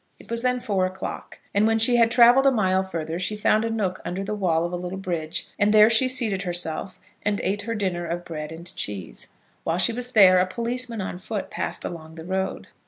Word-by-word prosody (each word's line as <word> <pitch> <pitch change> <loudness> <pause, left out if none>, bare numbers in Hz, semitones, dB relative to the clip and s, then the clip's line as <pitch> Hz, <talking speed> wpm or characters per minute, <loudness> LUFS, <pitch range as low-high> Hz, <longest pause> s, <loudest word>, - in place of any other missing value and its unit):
It - - -15
was 230 0 -1
then 250 0 +1
four 195 -5 0
o'clock, 185 0 -7 0.2
and 205 +2 +3
when 225 0 +2
she 240 +2 +4
had 230 -1 +5
travelled 245 +3 +6
a - - +6
mile 190 -6 +2
further 165 -3 -4
she 185 +3 -1
found 215 +1 +2
a 230 - -1
nook 200 -5 -2
under 185 +2 -4
the 210 +2 -3
wall 170 -5 +1
of 175 - -5
a - - 0
little 180 +1 -5
bridge, 170 -4 -3
and 205 +1 +4
there 215 +1 +7
she 235 +3 +3
seated 230 -7 0
herself, 175 0 -3 0.2
and 205 -1 0
ate 205 +2 0
her 230 +2 -4
dinner 180 -5 -2
of 175 +1 -4
bread 155 -2 -6
and 170 +2 -7
cheese. 95 -12 -4 0.4
While 165 +1 0
she 225 +5 +3
was 250 +1 -4
there 185 -4 +7
a 180 - +2
policeman 235 +2 -3
on 185 -1 -5
foot 205 +2 -5
passed - - -4
along 160 -2 -7
the 160 -1 -9
road. 190 +1 -3
190 Hz, 230 wpm, -24 LUFS, 175-225 Hz, 0.4 s, there